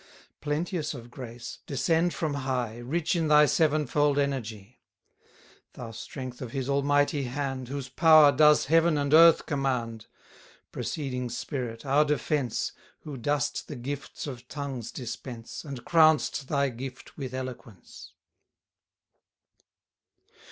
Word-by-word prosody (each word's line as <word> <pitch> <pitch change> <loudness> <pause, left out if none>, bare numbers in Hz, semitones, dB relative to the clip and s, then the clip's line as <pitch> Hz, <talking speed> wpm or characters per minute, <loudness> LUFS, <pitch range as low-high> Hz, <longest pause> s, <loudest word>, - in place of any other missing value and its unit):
Plenteous 155 +1 -2
of 120 -1 -11
grace, 120 -2 -8
descend 165 +5 +1
from 155 -3 -2
high, 130 -4 -2
Rich 160 +8 -1
in 165 -2 0
thy 150 0 +6
sevenfold 150 -2 +2
energy! 120 -6 -3 0.9
Thou 115 -2 -8
strength 125 +2 -8
of 120 -3 -7
his 135 -2 -3
Almighty 145 0 +1
hand, 135 0 -4
Whose 135 0 -5
power 155 +1 +6
does 150 +2 +5
heaven 165 +1 +3
and 140 0 0
earth 165 +1 +7
command: 125 -6 -2 0.6
Proceeding 125 -4 -3
Spirit, 120 0 -5
our 140 +2 +4
defence, 150 -3 -1 0.3
Who 150 -2 -7
dost 145 +4 -1
the 150 - -7
gifts 140 +3 -6
of 125 -4 -8
tongues 135 -6 -5
dispense, 120 -1 -7
And 135 -6 -8
crown'st 155 -4 +3
thy 140 -1 +1
gift 130 +2 -9
with 130 -2 -6
eloquence! 125 -6 -9
140 Hz, 120 wpm, -27 LUFS, 125-150 Hz, 0.9 s, earth